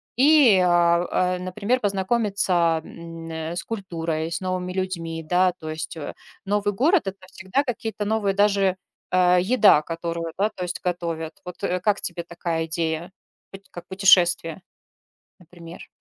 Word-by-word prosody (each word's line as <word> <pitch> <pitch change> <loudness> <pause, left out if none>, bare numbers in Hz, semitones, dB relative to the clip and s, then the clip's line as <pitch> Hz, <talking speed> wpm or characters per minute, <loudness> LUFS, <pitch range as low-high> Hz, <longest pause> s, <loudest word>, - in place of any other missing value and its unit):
и, 275 -5 +6
а 175 +1 +2
а, 180 - -6
например, 200 +7 -1
познакомиться, 195 -5 +1
м, 165 -1 -10
н - - -7 0.3
с - - -3
культурой, 165 -6 -4
с - - -2
новыми 185 -1 -3
людьми, 170 -3 -3
да. 180 +1 +3
То 155 - -7
есть, 155 +1 -6
э, 145 - -6 0.3
новый 205 +1 0
город- 315 - +3
это 195 0 -5
всегда 190 +9 -1
какие-то 225 -3 -4
новые, 210 -2 0
даже, 200 -2 +2 0.3
э, 180 0 +4
еда, 200 -6 +5
которую, 165 0 -4
да, 205 +2 +2
то 180 - -5
есть 180 0 -4
готовят. 170 -3 -3
Вот, 180 -1 -10
э, 180 - 0
как 205 +1 +1
тебе 175 -1 -5
такая 170 -1 -3
идея 165 +2 -3 0.4
поть 195 0 -12
как 175 - -10
путешествие? 180 -3 +3 0.8
Например. 170 -1 -12
180 Hz, 150 wpm, -23 LUFS, 170-200 Hz, 0.8 s, и